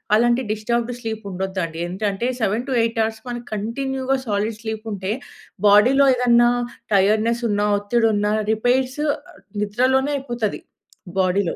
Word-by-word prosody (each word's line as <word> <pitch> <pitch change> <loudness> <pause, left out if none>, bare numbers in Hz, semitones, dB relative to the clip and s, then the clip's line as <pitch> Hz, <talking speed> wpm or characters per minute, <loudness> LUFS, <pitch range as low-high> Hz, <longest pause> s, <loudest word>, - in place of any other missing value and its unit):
అలాంటి 240 +3 +3
disturbed 235 +3 -1
sleep 220 -2 -5
ఉండదు 190 +1 -3
అండి. 165 -1 -9
ఏంటంటే 195 +5 -2
7-8 230 +2 0
అవర్స్ 220 0 -3 0.3
కంటిన్యూ‌గా 265 +5 -1
సాలిడ్ 210 +1 -1
స్లీప్ 220 0 -5
ఉంటే 190 +1 -3 0.6
బాడీ‌లో 255 +7 +6
ఏదన్నా 240 -1 +4 0.4
టైర్డ్‌నెస్ 215 +4 +2
ఉన్న, 205 0 +1 0.2
ఒత్తిడి 225 +3 +1
ఉన్న 205 0 +1 0.2
రిపేర్స్ 255 +5 +1 0.6
నిద్రలోనే 260 +7 +1
అయిపోతది 240 -6 -3 0.6
బాడీలో. 185 -1 +1
225 Hz, 115 wpm, -21 LUFS, 205-245 Hz, 0.6 s, బాడీ‌లో